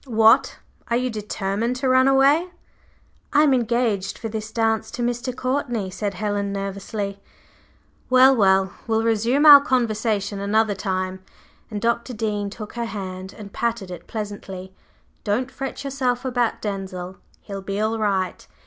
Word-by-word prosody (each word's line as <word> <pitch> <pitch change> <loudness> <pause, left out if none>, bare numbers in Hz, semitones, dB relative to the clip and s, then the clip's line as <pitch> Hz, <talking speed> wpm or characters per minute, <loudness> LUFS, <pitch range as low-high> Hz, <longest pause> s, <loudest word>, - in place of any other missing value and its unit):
What! 225 -2 +4 0.3
Are 235 - +1
you 250 0 -1
determined 210 +2 -2
to 260 +1 -2
run 260 +1 +5
away?" 275 +6 +4 0.9
"I 295 - +6
am 290 -3 +4
engaged 235 -5 0
for 225 - -5
this 215 0 -5
dance 225 -1 0
to 240 - -4
Mr. 245 +1 -2
Courtney," 245 -7 -1
said 200 +1 -3
Helen, 205 0 -2
nervously. 200 0 -4 0.9
"Well, 260 +1 +7
well! 190 -3 +3
We'll 225 0 +1
resume 230 +6 +2
our 290 -2 +11
conversation 220 -6 0
another 210 +1 +2
time," 185 -1 -3 0.5
and 210 -2 -4
Dr. 235 +2 -1
Dean 210 -2 -2
took 210 +1 -9
her 235 -1 -3
hand 190 -3 -6
and 205 -3 -10
patted 230 -5 -2
it 180 - -9
pleasantly. 195 -3 -6 0.5
"Don't 245 +6 -1
fret 270 +1 -5
yourself 260 -2 -1
about 245 -2 0
Denzil; 190 -3 -5 0.3
he'll 200 -2 -6
be 195 +1 -4
all 220 +1 0
right. 195 -3 -1
220 Hz, 150 wpm, -23 LUFS, 200-245 Hz, 0.9 s, our